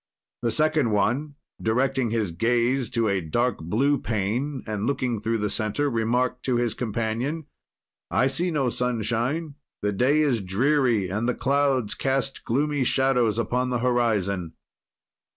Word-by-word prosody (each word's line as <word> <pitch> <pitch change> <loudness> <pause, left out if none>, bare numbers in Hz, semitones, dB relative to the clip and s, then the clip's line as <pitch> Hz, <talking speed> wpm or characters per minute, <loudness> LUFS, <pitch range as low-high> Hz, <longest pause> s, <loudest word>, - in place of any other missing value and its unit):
"The 120 - +1
second 155 +2 +2
one, 125 +8 0 0.3
directing 130 +2 +1
his 110 -5 -1
gaze 120 +7 +1
to 115 -1 0
a 100 -2 +1
dark 120 +10 0
blue 130 - +1
pane 120 +6 -2
and, 105 0 -2
looking 130 -5 -1
through 115 +1 0
the 105 -1 -1
center, 120 +6 0
remarked 125 +2 0
to 130 - +1
his 120 -2 +1
companion, 120 +7 -2 0.6
I - - +2
see 150 +7 0
no 140 -6 +1
sunshine, 125 +6 -1 0.3
the 105 - +1
day 135 +9 +3
is 130 -7 +2
dreary 115 +1 +1
and 110 +6 -1
the 125 - 0
clouds 135 -3 +1
cast 135 0 -1
gloomy 145 +3 +1
shadows 125 -4 +2
upon 125 +3 0
the 125 - 0
horizon. 105 -8 0
120 Hz, 145 wpm, -25 LUFS, 110-135 Hz, 0.6 s, day